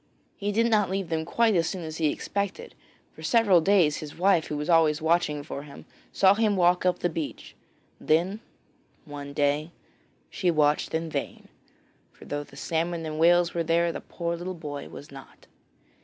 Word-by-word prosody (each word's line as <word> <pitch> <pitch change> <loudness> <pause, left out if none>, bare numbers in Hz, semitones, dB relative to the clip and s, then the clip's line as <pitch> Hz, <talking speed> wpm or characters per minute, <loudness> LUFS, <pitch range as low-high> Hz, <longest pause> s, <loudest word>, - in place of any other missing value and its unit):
He 205 0 -2
did 225 +3 +2
not 210 -4 +3
leave 190 -2 -3
them 160 -1 -1
quite 230 +5 +2
as 165 -1 +2
soon 185 -3 -5
as 160 0 -6
he 160 - +1
expected. 200 +6 -4 0.4
For - - -14
several 205 -7 +4
days 170 -4 +3
his 150 -2 -8
wife 180 -2 +3
who 150 - -4
was 150 - -4
always 160 -3 +4
watching 160 -3 +1
for 140 -1 -6
him, 145 -1 -12 0.3
saw 190 0 +5
him 215 -1 +1
walk 180 0 +3
up 180 - +2
the - - 0
beach; 160 -3 -6 0.5
then 175 +7 +1 0.7
one 145 -1 -8
day 145 +2 0 0.6
she 180 - 0
watched 150 -1 +1
in 160 0 -3
vain, - - -5 0.6
for - - -16
though 145 0 -4
salmon 165 +4 -3
and 155 0 -5
whales 175 +1 +4
were 170 - -1
there, 170 +1 +2
the - - -6
poor 170 -1 -4
little 180 +2 -5
boy 145 -3 -7
was 145 - -11
not. 135 -1 -14
165 Hz, 180 wpm, -26 LUFS, 150-185 Hz, 0.7 s, saw